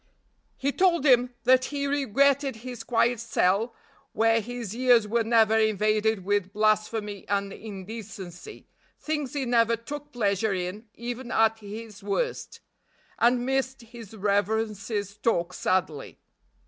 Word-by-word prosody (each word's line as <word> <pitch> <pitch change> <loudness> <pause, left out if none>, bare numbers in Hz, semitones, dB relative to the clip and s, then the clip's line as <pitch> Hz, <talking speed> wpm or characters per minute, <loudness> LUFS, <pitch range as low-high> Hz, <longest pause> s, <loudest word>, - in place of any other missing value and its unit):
He 275 +1 0
told 340 -3 +2
him 250 -2 +4
that 255 +1 +5
he 285 -1 -3
regretted 275 0 +2
his 245 -3 -6
quiet 235 0 +1
cell 225 0 +1 0.4
where 225 +1 +3
his 235 -2 -6
ears 245 -3 +4
were 230 +2 +1
never 225 -1 +4
invaded 215 -1 +1
with 200 -1 0
blasphemy 215 -1 0
and 200 0 -1
indecency, 200 - -9 0.3
things 300 -4 -3
he 280 -2 -2
never 235 -1 +3
took 290 +6 -8
pleasure 205 -3 0
in 185 +5 -5
even 240 +1 -6
at 225 0 +3
his 215 0 -9
worst 205 - -3 0.6
and 245 +1 +3
missed 265 0 -1
his 230 -2 -12
reverence's 205 0 -1
talk 180 -5 0
sadly. 170 -6 -1
225 Hz, 125 wpm, -26 LUFS, 205-245 Hz, 0.6 s, that